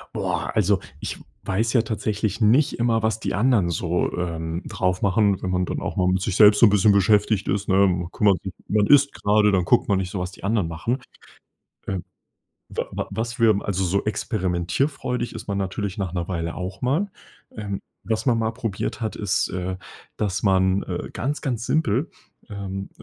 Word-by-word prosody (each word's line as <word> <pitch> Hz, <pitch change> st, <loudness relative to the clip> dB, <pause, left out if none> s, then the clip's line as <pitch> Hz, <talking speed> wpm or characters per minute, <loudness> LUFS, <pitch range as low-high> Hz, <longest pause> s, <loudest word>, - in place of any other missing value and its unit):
Boah, -, -, -2 dB
also 100 Hz, -2 st, +3 dB, 0.2 s
ich -, -, -4 dB, 0.2 s
weiß 110 Hz, +5 st, 0 dB
ja 120 Hz, -, +5 dB
tatsächlich 110 Hz, -1 st, -2 dB
nicht 120 Hz, +6 st, +3 dB
immer, 115 Hz, -2 st, +2 dB
was 110 Hz, 0 st, +1 dB
die -, -, -3 dB
anderen 105 Hz, -3 st, +3 dB
so, 85 Hz, +1 st, 0 dB
ähm, 85 Hz, -1 st, -3 dB
drauf 90 Hz, -1 st, -1 dB
machen, 100 Hz, -1 st, +2 dB
wenn 95 Hz, -, -2 dB
man 90 Hz, 0 st, +1 dB
dann -, -, -4 dB
auch -, -, -4 dB
mal 90 Hz, -1 st, +2 dB
mit 95 Hz, 0 st, +1 dB
sich 95 Hz, 0 st, -1 dB
selbst 105 Hz, -1 st, +7 dB
so 120 Hz, -, +8 dB
'n -, -, +4 dB
bisschen 100 Hz, 0 st, +4 dB
beschäftigt 100 Hz, +1 st, +3 dB
ist, 100 Hz, +1 st, -1 dB
ne? 95 Hz, -, +2 dB
Man 90 Hz, -3 st, +2 dB
kümmert 100 Hz, -3 st, +2 dB
sich 95 Hz, -, -6 dB, 0.2 s
man 105 Hz, -1 st, +2 dB
isst 140 Hz, 0 st, +6 dB
grade, 105 Hz, 0 st, +3 dB
dann 90 Hz, -2 st, +2 dB
guckt -, -, +3 dB
man 100 Hz, -, +3 dB
nicht 95 Hz, -1 st, -2 dB
so, 100 Hz, -, -3 dB
was 90 Hz, +1 st, -4 dB
die 95 Hz, -, -10 dB
anderen 100 Hz, -5 st, +1 dB
machen. 105 Hz, +11 st, -2 dB, 0.9 s
Ähm. 95 Hz, -3 st, -3 dB, 0.7 s
Wa -, -, -2 dB
wa -, -, -3 dB
was 115 Hz, +2 st, -3 dB
wir 115 Hz, -, +6 dB
m 100 Hz, -1 st, +1 dB
also 95 Hz, -1 st, -1 dB
so 100 Hz, +3 st, 0 dB
experimentierfreudig 105 Hz, -, -1 dB
ist -, -, -8 dB
man 100 Hz, -, -1 dB
natürlich 100 Hz, 0 st, -3 dB
nach 95 Hz, -3 st, -2 dB
'ner 85 Hz, -2 st, -2 dB
Weile 85 Hz, -2 st, -3 dB
auch 90 Hz, +2 st, -6 dB
mal. 150 Hz, +11 st, +1 dB, 0.5 s
Ähm, 100 Hz, -2 st, -4 dB, 0.2 s
was 110 Hz, +3 st, -2 dB
man 120 Hz, -2 st, +3 dB
mal 110 Hz, 0 st, 0 dB
probiert 115 Hz, -3 st, -4 dB
hat, 110 Hz, -2 st, -2 dB
ist, 100 Hz, -3 st, 0 dB
äh, 90 Hz, 0 st, -3 dB, 0.4 s
dass 100 Hz, -4 st, -1 dB
man, 95 Hz, -1 st, +3 dB
äh -, -, -5 dB
ganz, 145 Hz, +3 st, -2 dB
ganz 120 Hz, -4 st, -2 dB
simpel 145 Hz, -1 st, +1 dB, 0.4 s
ähm, 100 Hz, -1 st, -5 dB
100 Hz, 200 wpm, -23 LUFS, 95-110 Hz, 0.9 s, so